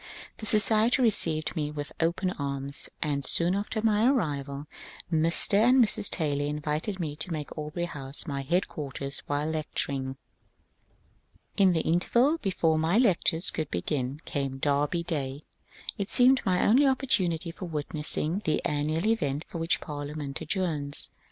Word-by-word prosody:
This 215 - -4
society 220 +3 +3
received 165 -11 +1
me 150 -3 -1
with 145 -1 -6
open 175 +3 0
arms, 140 -2 -5
and 145 -2 -1
soon 175 +5 +2
after 210 +2 -2
my 220 +1 +3
arrival 145 - -1 0.5
Mr. 165 +5 +4
and 250 +4 +5
Mrs. 220 -4 +5
Taylor 145 -4 -1
invited 150 +6 -3
me 155 -4 -3
to 160 +4 -4
make 150 -3 -5
Aubrey 155 +3 -3
House 140 -4 -4
my 140 -4 -3
headquarters 140 -3 -2
while 145 +1 -1
lecturing. 140 -4 -2 1.4
In 190 -2 +4
the 160 - +1
interval 240 - +2
before 165 - +1
my 165 +6 +2
lectures 180 -7 +3
could 155 -2 -3
begin 130 - -2
came 135 -2 -3
Derby 145 +4 0
Day. 145 -4 -3 0.6
It 200 - -2
seemed 255 +1 +5
my 180 -1 +2
only 265 +6 +5
opportunity 185 - +1
for 180 - -8
witnessing 155 +2 -2
the 155 - +1
an 145 0 0
nual 160 +4 -1
event 155 -10 0
for 170 - -6
which 165 +1 0
Parliament 145 -1 -5
adjourns. 155 -4 -2
160 Hz, 145 wpm, -28 LUFS, 145-190 Hz, 1.4 s, and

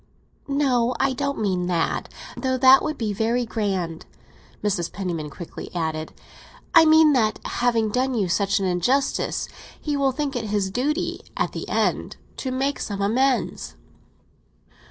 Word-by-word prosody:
"No, 255 -4 +1
I 270 0 +2
don't 280 +1 -2
mean 185 -4 0
that; 170 -2 -1 0.3
though 260 -1 -1
that 260 +1 +7
would 310 -1 -3
be 215 -3 -2
very 230 +4 0
grand!" 190 -7 -3 0.6
Mrs. 195 -5 0
Penniman 170 -6 -4
quickly 170 +4 -8
added. 160 -2 -2 0.6
"I 330 -2 +8
mean 315 -1 +6
that 220 -5 +2
having 230 -3 +1
done 255 +2 0
you 205 -5 +1
such 195 +3 +1
an 195 - -1
injustice, 190 +10 0 0.3
he 295 -1 -2
will 275 -1 +2
think 280 +1 -3
it 235 -2 -2
his 205 -2 -1
duty, 295 - -1 0.2
at - - 0
the - - -6
end, - - 0 0.2
to 265 - -3
make 270 +2 -1
some 200 -2 -4
amends." 250 +6 0
235 Hz, 150 wpm, -23 LUFS, 195-270 Hz, 0.6 s, I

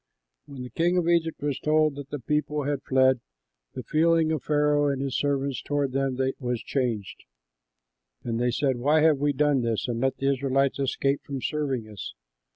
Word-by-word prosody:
When 135 -3 -8
the 125 - -9
king 175 +7 +1
of 175 -2 +1
Egypt 165 -2 +1
was 145 -2 -1
told 155 0 +2
that 140 0 -9
the 145 - -4
people 150 +3 -1
had 140 -1 -2
fled, 130 -1 +3 0.6
the 130 - -5
feeling 160 +2 +2
of 155 -4 -1
Pharaoh 150 -1 +2
and 140 -2 -1
his 135 -2 -2
servants 140 -2 -1
toward 145 -2 -1
them 135 -1 -1 0.2
was 125 -2 -3
changed, 120 -7 -3 1.0
and 115 -1 -2
they 125 0 +2
said, 130 +1 0
"Why 150 +5 +3
have 155 -3 +4
we 145 +1 +2
done 145 -1 +2
this 115 -1 -1
and 120 -1 -2
let 135 0 0
the 135 0 +1
Israelites 135 +1 0
escape 135 +1 0
from 140 -1 -5
serving 135 -5 -2
us?" 105 -2 -8
140 Hz, 185 wpm, -26 LUFS, 130-150 Hz, 1.0 s, have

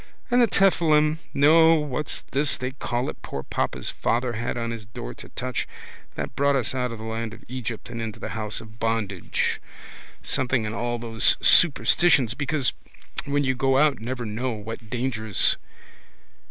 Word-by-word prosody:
And 245 +1 +5
the 235 - +5
tephilim 160 -6 +3
no 160 +3 +6
what's 150 -1 -2
this 140 +2 +1
they 130 0 -3
call 125 -2 -3
it - - -6
poor 70 - -6
papa's - - -2
father 120 +1 0
had 120 +2 -3
on 115 -1 -2
his 115 -2 -6
door - - -7
to - - -11
touch. 125 -1 -3 0.5
That - - -5
brought 140 0 +2
us 130 -3 0
out 125 -2 -1
of 115 - -6
the 110 - -9
land 110 0 -4
of - - -16
Egypt 120 -3 -5
and 115 -1 -5
into 110 -2 -5
the - - -5
house 110 -1 -2
of 110 -1 -14
bondage. 115 -5 -1 0.6
Something 125 -3 0
in 105 - -3
all 120 +1 -2
those 115 -1 +3
superstitions 155 -6 +5
because 140 0 0 0.5
when 145 0 0
you 130 -1 +1
go 135 +1 +2
out 145 -2 +3
never 120 +2 -4
know 115 +4 -2
what 110 +1 -8
dangers. 115 -4 +1
125 Hz, 170 wpm, -25 LUFS, 115-140 Hz, 0.6 s, no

